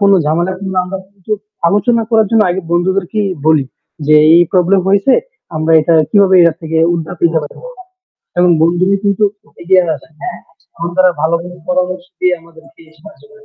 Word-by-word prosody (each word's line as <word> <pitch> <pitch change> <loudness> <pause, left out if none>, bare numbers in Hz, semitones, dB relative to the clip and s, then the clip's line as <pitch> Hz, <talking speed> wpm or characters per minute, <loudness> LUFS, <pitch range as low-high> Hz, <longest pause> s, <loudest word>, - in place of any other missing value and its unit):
কোন 200 0 +3
ঝামেলার 170 +5 -1
কিংবা 190 -1 -3
আমরা 190 +1 -6 0.2
কিছু 200 +2 -7 0.4
আলোচনা 225 +4 +1
করার 220 -2 +3
জন্য 225 -2 +4
আগে 185 +2 -2
বন্ধুদেরকে 190 +3 -1 0.3
বলি 155 -4 +3 0.4
যে, 155 - +4 0.2
"এই 175 - +6
problem 185 +1 +3
হয়েছে, 200 +6 +3 0.4
আমরা 155 +1 0
এটা 165 +2 +1 0.2
কিভাবে 195 -2 +4
এ - - +6 0.2
থেকে 160 0 -2 0.2
উদ্ধার 165 +1 -5
পেতে 165 -1 +2
পারি?" 145 - -10 0.8
এবং 180 0 +4
বন্ধুই 180 +4 +2
কিন্তু 200 +1 +1 0.4
এগিয়ে 185 +1 +3
আসে, - - -19
হ্যাঁ, 365 - -6 0.4
বন্ধুরা 175 +2 +1
ভালো 160 +1 +1
কোনো 180 0 -11
পরামর্শ 180 0 -2
দিয়ে 180 0 +1
আমাদেরকে 165 0 -19 0.2
সাহায্য 210 - -16
করে। 435 0 -19
180 Hz, 165 wpm, -14 LUFS, 170-195 Hz, 0.8 s, এই